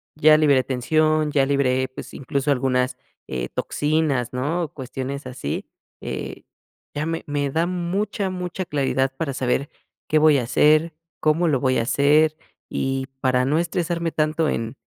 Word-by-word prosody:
ya 155 0 +6
liberé 140 -4 +4
tensión, 155 +4 +1
ya 140 -2 +3
liberé, 130 -2 +1
pues, 130 - -10
incluso, 140 +2 -1
algunas, 125 -1 +1 0.3
eh, 65 -1 -3
toxinas, 145 -5 0
¿no?, 150 +6 -1
cuestiones 135 +1 -5
así. 125 - -4 0.3
Eh, - - -6 0.5
ya 145 +1 -1
me 165 0 -3
me 145 -1 -1
da 165 +4 +1
mucha, 190 +3 -2
mucha 180 0 -4
claridad 135 -3 0
para 140 -1 -3
saber 130 +2 -1 0.4
qué 155 - +3
voy 150 -2 +5
a 125 - 0
hacer, 155 +6 +3 0.3
cómo 160 +3 +2
lo 140 -4 +2
voy 130 -1 +2
a - - +1
hacer 150 +5 +3 0.3
y 135 0 -2
para 125 -1 +2
no 150 +4 +2
estresarme 170 -1 -1
tanto 155 +1 +1
en 115 +2 -3
145 Hz, 155 wpm, -23 LUFS, 130-155 Hz, 0.5 s, ya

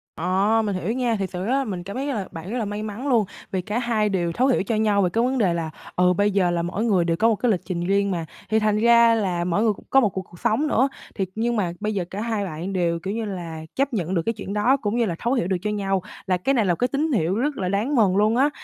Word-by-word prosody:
Ờ, 195 +6 +2
mình 200 -2 -1
hiểu 185 +4 -2
nha. 245 -2 0
Thiệt 195 -3 -2
sự 180 0 -4
rất 230 - -1
là 275 +1 +2
mình 185 -6 -4
cảm 200 +3 -7
thấy 270 +2 -2
rất 285 - -1
là 205 -5 -3
bạn 165 +3 -8
rất 245 - -2
là 230 - -1
may 205 +1 -4
mắn 215 +6 -5
luôn, 235 -6 +3 0.3
vì 190 - -1
cả 210 +5 -2
hai 225 -3 +1
đều 175 -4 0
thấu 250 +9 +1
hiểu 255 -7 +2
cho 220 +3 -1
nhau 210 -2 +2
về 180 - +2
cái 230 +6 +1
vấn 260 +2 +1
đề 195 -8 +2
là, 165 -2 -2 0.3
ừ, 180 0 +4
bây 205 +3 +2
giờ 190 -3 +2
là 170 -1 0
mỗi 180 +6 -2
người 190 -7 +2
đều 165 -1 0
có 225 - +3
một 225 - +2
cái 240 +3 +1
lịch 185 - 0
trình 175 -2 -3
riêng 200 +1 +2
mà. 170 -3 -2 0.2
Thì 220 +1 +3
thành 215 -1 +1
ra 235 +1 +5
là 185 -6 0
mỗi 180 +4 +1
người 220 -2 +3
cũng - - -16
có 270 - +6
một 225 -6 +3
cuộc 190 - -4
cuộc 175 -2 -16
sống 280 +8 +1
nữa, 270 -2 +2 0.3
thiệt, 190 - -1
nhưng 235 +2 0
mà 190 -6 0
bây 215 0 -2
giờ, 190 -4 -1
cả 200 - -5
hai 220 -3 -1
bạn 175 +2 -5
đều, 170 -2 0
kiểu 190 +4 -4
như 225 0 -2
là, 170 -5 -6
chấp 275 0 0
nhận 185 -4 -1
được 170 - +2
cái 230 - +1
chuyện 200 -2 -6
đó, 240 +6 +3
cũng 215 -4 -2
như 235 - +2
là 175 -5 -2
thấu 240 +2 0
hiểu 240 -10 0
được 190 -1 0
cho 210 - -2
nhau, 195 -2 0 0.2
là 185 -2 +1
cái 265 +10 0
này 230 -6 +2
là 175 -2 +2
cái 245 - +1
tín 295 +4 -1
hiệu 185 - +1
rất 280 +6 -1
là 185 -2 -1
đáng 215 +9 0
mừng 205 -6 +4
luôn 215 +2 +3
á. 275 +4 +4
205 Hz, 315 wpm, -23 LUFS, 185-230 Hz, 0.3 s, có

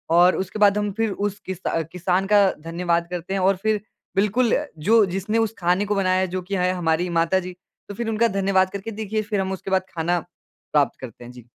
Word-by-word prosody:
और 180 +1 +6
उसके 195 +3 -4
बाद 205 0 +5
हम 205 -1 -1
फिर 225 -2 +1
उस 205 0 -3
किस 190 -2 -4
अ, 165 - 0
किसान 180 +4 -1
का 205 - +7 0.3
धन्यवाद 170 0 0
करते 180 +2 -4
हैं 195 - 0
और 195 +1 +3
फिर 215 -2 +1 0.3
बिल्कुल 210 +5 +2 0.4
जो 225 -2 +6
जिसने 210 +4 -1
उस 215 - -14
खाने 180 +3 +2
को 205 0 -1
बनाया 185 -1 +2
है 190 - +1
जो 185 - -1
कि 200 - 0
है 180 0 +1
हमारी 175 0 0
माता 170 +3 +2
जी, 180 0 -7 0.3
तो - - -5
फिर 235 0 -3
उनका 225 +1 +2
धन्यवाद 190 -1 +3
करके 200 +3 -5
देखिए 215 +1 -1
फिर 205 -1 -2
हम 190 0 -2
उसके 190 +1 -6
बाद 185 0 +2
खाना 170 +2 +1 0.5
प्राप्त 145 -2 +2
करते 120 -2 -10
हैं 120 - -10
जी। 125 -2 -14
190 Hz, 230 wpm, -23 LUFS, 175-205 Hz, 0.5 s, का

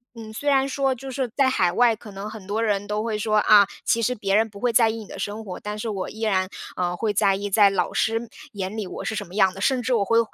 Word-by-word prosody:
嗯， 220 -1 -9
虽 285 +7 -6
然 275 -1 +3
说 270 0 +1
就 265 +2 -9
是 260 -1 -2
在 270 -2 +4
海 180 -8 +2
外， 235 +3 +3
可 215 -1 -12
能 200 +2 -6
很 215 -3 -10
多 210 +3 -2
人 205 -2 0
都 210 +1 -2
会 220 -2 -2
说： 215 0 +1
“啊， 205 -1 +8 0.2
其 230 - +1
实 250 - +1
别 200 -3 -1
人 220 +1 +3
不 200 -1 -13
会 245 +1 +1
在 230 0 +5
意 225 - -3
你 215 - -9
的 - - -9
生 205 +3 -4
活。” 185 -3 -7
但 210 0 -5
是 225 - -3
我 195 -3 -3
依 220 - -10
然， 190 -4 +1 0.3
呃， 175 -1 -1
会 215 +2 -1
在 195 -1 +3
意 200 +1 -4
在 200 -1 +5
老 - - 0
师 225 +1 0 0.2
眼 200 0 -5
里 210 - -3
我 - - -7
是 220 - -3
什 - - -3
么 175 - -15
样 190 -2 +4
的， - - -9
甚 255 +4 +1
至 255 - -3
我 200 -3 +1
会 230 +3 +3
215 Hz, 315 characters per minute, -23 LUFS, 200-230 Hz, 0.3 s, 啊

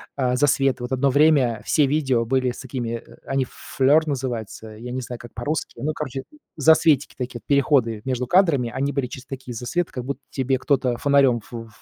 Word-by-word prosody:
а 125 -2 +1
засветы. 135 -2 +2
Вот 125 - -5
1 135 +1 +2
время 135 -6 +3
все 150 -3 +3
видео 135 -5 +1
были 130 +1 +1
с - - -10
такими, 125 -3 -4
э, - - -16
они 135 -1 0
флёр 150 +4 +2
называются, 120 -5 -4
я 115 +3 -8
не 130 - -3
знаю 120 0 -7
как 120 -1 -12
по-русски, 145 +8 -3
ну, 155 +2 0
короче, 135 -3 -5 0.3
засветики 155 -2 +4
такие, 125 -2 -5
переходы 135 -6 +2
между 125 -1 -1
кадрами, 160 -8 +3
они 140 +1 -1
были 135 -3 -1
через 130 +1 -9
такие 130 -2 -7
засветы, 145 +10 -2
как 125 -5 -5
будто 140 0 -4
тебе 130 -1 0
кто-то 130 -3 +1
фонарём 140 -5 +3
в 110 - -19
ф - - -16
130 Hz, 195 wpm, -23 LUFS, 125-140 Hz, 0.3 s, засветики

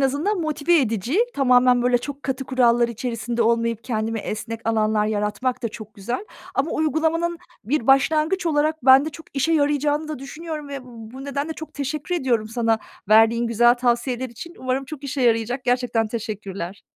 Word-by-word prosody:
azından 295 +9 +1
motive 315 +1 +2
edici. 230 - -1 0.2
Tamamen 250 -2 +4
böyle 245 0 +3
çok 285 +3 -7
katı 265 0 -3
kurallar 240 -2 +3
içerisinde 235 0 -2
olmayıp 230 0 +1
kendime 225 -1 -2
esnek 225 +2 -5
alanlar 215 -1 +2
yaratmak 215 +4 -1
da 230 - 0
çok 215 -1 -11
güzel 240 - -4 0.3
ama 280 +4 0
uygulamanın 320 +2 0 0.3
bir 245 +2 -1
başlangıç 310 +6 +3
olarak 305 -2 +1
bende 270 +4 +7
çok 320 +2 -12
işe 295 +5 +2
yarayacağını 295 0 +1
da 305 - -4
düşünüyorum 300 +2 -7
ve 280 -1 -5
bu 240 +2 -10
nedenle 280 +3 -3
çok 315 0 -10
teşekkür 295 +4 -3
ediyorum 240 -9 0
sana 225 -1 +1 0.3
verdiğin 225 +2 +5
güzel 240 +1 +4
tavsiyeler 245 +1 0
için. 335 +9 -10
Umarım 260 +1 -1
çok 285 0 -9
işe 280 0 -3
yarayacak. 235 +2 +1
Gerçekten 245 -3 +1
teşekkürler. 205 -5 -5
255 Hz, 160 wpm, -22 LUFS, 230-290 Hz, 0.3 s, bende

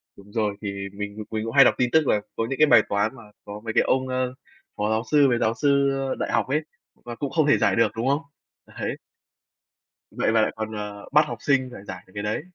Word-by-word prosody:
Đúng 100 +1 -16
rồi, 105 -2 -1
thì 100 -1 -5
mình 105 +1 -6
mình 110 -1 -2
cũng 115 - -4
hay 135 - +9
đọc - - +5
tin 125 -1 +1
tức 160 -3 +4
là 105 - +2
có 115 - -1
những 135 - -2
cái 155 - +6
bài 110 - +7
toán 105 +4 0
mà 120 - -13 0.2
có 105 +1 -7
mấy 115 - -3
cái - - +4
ông, 130 0 +1
ơ, 130 0 -1 0.4
phó 105 +1 0
giáo 110 +1 0
sư 145 -2 +6
với 120 - +2
giáo 110 +1 +1
sư 140 +1 +2 0.3
đại - - -2
học - - +1
ấy, 145 +4 +1 0.3
và 120 -1 -9
cũng 140 +2 -4
không 155 -3 +2
thể 145 - +5
giải - - +2
được, 115 -2 +3
đúng 115 +3 -2
không 140 +2 +2 0.5
Đấy. - - -5 1.1
Vậy - - 0
mà 110 -1 +4
lại - - +1
còn, 110 0 -4
ờ, 105 -1 -6
bắt 150 +1 +5
học - - -5
sinh 135 -3 +1
phải 100 - -10
giải 90 -1 -8
được 95 - -20
cái 100 - -4
đấy. 105 +6 -2
115 Hz, 255 wpm, -24 LUFS, 105-135 Hz, 1.1 s, hay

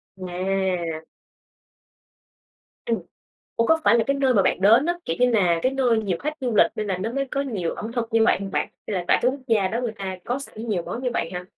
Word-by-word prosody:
À. 180 -3 -2 1.8
Ừm. 230 -1 0 0.6
Ủa, 230 - +2
có 320 0 +3
phải 235 - +5
là 225 - +2
cái 275 0 +1
nơi 265 -2 +2
mà 195 - +5
bạn 185 - +1
đến 225 - +5
á, 345 - +1
kiểu 165 - -2
như 250 0 +4
là, 180 -7 +3
cái 255 - +2
nơi 250 -4 +2
nhiều 185 -4 -1
khách 300 +1 -2
du 245 -4 -1
lịch 170 - +7
nên 215 - -3
là 190 -2 -1
nó 225 +5 -3
mới 275 +1 -1
có 275 - -1
nhiều 210 -12 -2
ẩm 225 +2 -6
thực 235 -2 -2
như 225 -1 +4
vậy - - +4
hông 195 -1 -5
bạn? - - -1 0.2
Hay 210 - -3
là 180 -2 -2
tại - - +5
cái 250 - +4
quốc 275 +1 -7
gia 210 -5 +2
đó 230 +4 -2
người 235 -3 -2
ta 190 -1 -5
có 245 +3 -1
sẵn 230 -4 -8
nhiều 180 -5 0
món 245 - -6
như 250 - 0
vậy 165 - -1
ha? 180 0 -4
220 Hz, 255 wpm, -24 LUFS, 185-250 Hz, 1.8 s, lịch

